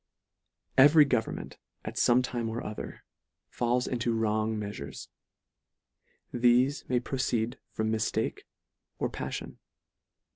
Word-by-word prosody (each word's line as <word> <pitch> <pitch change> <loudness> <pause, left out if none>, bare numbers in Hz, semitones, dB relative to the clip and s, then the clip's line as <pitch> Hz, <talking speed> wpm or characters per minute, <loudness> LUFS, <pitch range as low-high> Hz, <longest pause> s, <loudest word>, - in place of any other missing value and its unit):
Every 145 +2 +8
government, 125 -5 -2 0.3
at - - -4
fome 125 +1 +4
time 120 -2 -2
or 115 +2 -4
other, 105 - -7 0.5
falls 125 +1 +1
into 120 -2 -1
wrong 110 0 0
meafures; 100 -10 -6 1.2
thefe 125 +3 +3
may 125 -1 +3
pro 130 +2 -5
ceed 120 -1 0
from 110 0 -1
miftake 110 0 -1 0.6
or - - -1
pamon. - - -5
120 Hz, 110 wpm, -29 LUFS, 110-125 Hz, 1.2 s, Every